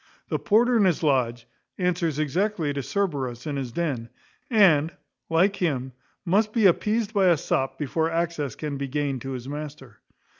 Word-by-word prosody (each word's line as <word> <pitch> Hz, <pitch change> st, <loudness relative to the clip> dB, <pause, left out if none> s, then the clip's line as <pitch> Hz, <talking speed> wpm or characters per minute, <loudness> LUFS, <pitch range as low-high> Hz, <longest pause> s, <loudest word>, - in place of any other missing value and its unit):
The -, -, -1 dB
porter 235 Hz, +3 st, +3 dB
in 205 Hz, -, +4 dB
his 175 Hz, -3 st, +1 dB
lodge 120 Hz, -5 st, +1 dB, 0.3 s
answers 175 Hz, -4 st, 0 dB
exactly 160 Hz, +1 st, 0 dB
to 140 Hz, -, -2 dB
Cerberus 135 Hz, -, -2 dB
in 150 Hz, -2 st, -3 dB
his 135 Hz, -3 st, -4 dB
den, 135 Hz, -7 st, -2 dB, 0.4 s
and, 170 Hz, -, +5 dB, 0.4 s
like 185 Hz, +5 st, +3 dB
him, 135 Hz, -7 st, -1 dB, 0.3 s
must 210 Hz, +4 st, +2 dB
be 225 Hz, -3 st, +3 dB
appeased 215 Hz, +4 st, +2 dB
by 195 Hz, -3 st, +3 dB
a 170 Hz, -2 st, +5 dB
sop 135 Hz, -1 st, -1 dB
before 160 Hz, +2 st, -1 dB
access 165 Hz, -6 st, -2 dB
can 150 Hz, -2 st, -4 dB
be 140 Hz, 0 st, -3 dB
gained 140 Hz, -2 st, -2 dB
to 135 Hz, +2 st, -5 dB
his 125 Hz, 0 st, -6 dB
master. 145 Hz, -5 st, -8 dB
155 Hz, 165 wpm, -25 LUFS, 135-185 Hz, 0.4 s, and